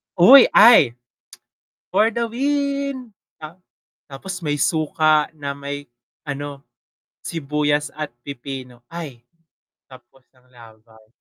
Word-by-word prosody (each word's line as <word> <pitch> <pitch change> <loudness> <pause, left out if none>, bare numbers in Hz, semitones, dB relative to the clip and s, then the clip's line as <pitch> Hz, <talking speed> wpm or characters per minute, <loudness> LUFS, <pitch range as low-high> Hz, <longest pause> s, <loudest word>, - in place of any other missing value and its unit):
Uy, 250 +10 +8
ay! 210 - +7 1.0
For 220 - +3
the 235 -1 -2
win! 275 -1 -2 0.3
Ta 155 +3 -10 0.5
tapos 185 +8 -8
may 150 -3 -2
suka 155 0 +1
na 145 -2 -5
may 140 -1 -8 0.3
ano, 145 -1 -7 0.6
sibuyas 150 -1 -2
at 155 -3 -5
pipino, 130 -3 -9
ay 145 -9 -8 0.6
tapos 130 0 -19
ng 125 0 -29
laban. 110 -2 -19
145 Hz, 100 wpm, -20 LUFS, 135-180 Hz, 1.0 s, Uy